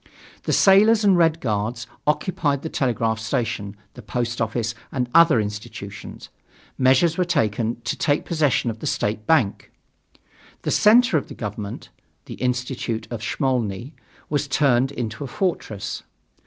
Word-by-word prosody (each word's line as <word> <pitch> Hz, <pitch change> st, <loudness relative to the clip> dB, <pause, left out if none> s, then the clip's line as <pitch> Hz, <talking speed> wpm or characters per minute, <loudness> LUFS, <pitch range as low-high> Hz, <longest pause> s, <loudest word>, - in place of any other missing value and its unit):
The -, -, 0 dB
sailors 210 Hz, +3 st, +5 dB
and 200 Hz, -2 st, +5 dB
Red 165 Hz, -2 st, +3 dB
Guards 110 Hz, +1 st, -2 dB, 0.2 s
occupied 150 Hz, -3 st, 0 dB
the 160 Hz, -, -3 dB
telegraph 115 Hz, -5 st, 0 dB
station, 110 Hz, -4 st, -2 dB, 0.2 s
the -, -, -11 dB
post 120 Hz, -1 st, -3 dB
office 115 Hz, +1 st, -1 dB, 0.2 s
and 125 Hz, -2 st, -1 dB
other 165 Hz, -7 st, +6 dB
institutions. 105 Hz, -1 st, -7 dB, 0.5 s
Measures 135 Hz, +7 st, +3 dB
were -, -, +4 dB
taken 115 Hz, -, 0 dB
to 115 Hz, -, -2 dB
take 145 Hz, 0 st, 0 dB
possession 145 Hz, -7 st, +1 dB
of 110 Hz, -, -10 dB
the -, -, -4 dB
state 105 Hz, +1 st, -2 dB
bank. 135 Hz, -12 st, +1 dB, 0.9 s
The -, -, -1 dB
center 220 Hz, -3 st, +5 dB
of -, -, -11 dB
the -, -, -10 dB
government, 105 Hz, -2 st, -6 dB, 0.4 s
the -, -, -8 dB
Institute 125 Hz, -2 st, -2 dB
of 115 Hz, -3 st, -4 dB
Smolny, 125 Hz, 0 st, -1 dB, 0.3 s
was 145 Hz, -1 st, -1 dB
turned 135 Hz, -2 st, +2 dB
into 115 Hz, -2 st, -4 dB
a -, -, -4 dB
fortress. 110 Hz, -, -3 dB
125 Hz, 140 wpm, -23 LUFS, 110-155 Hz, 0.9 s, other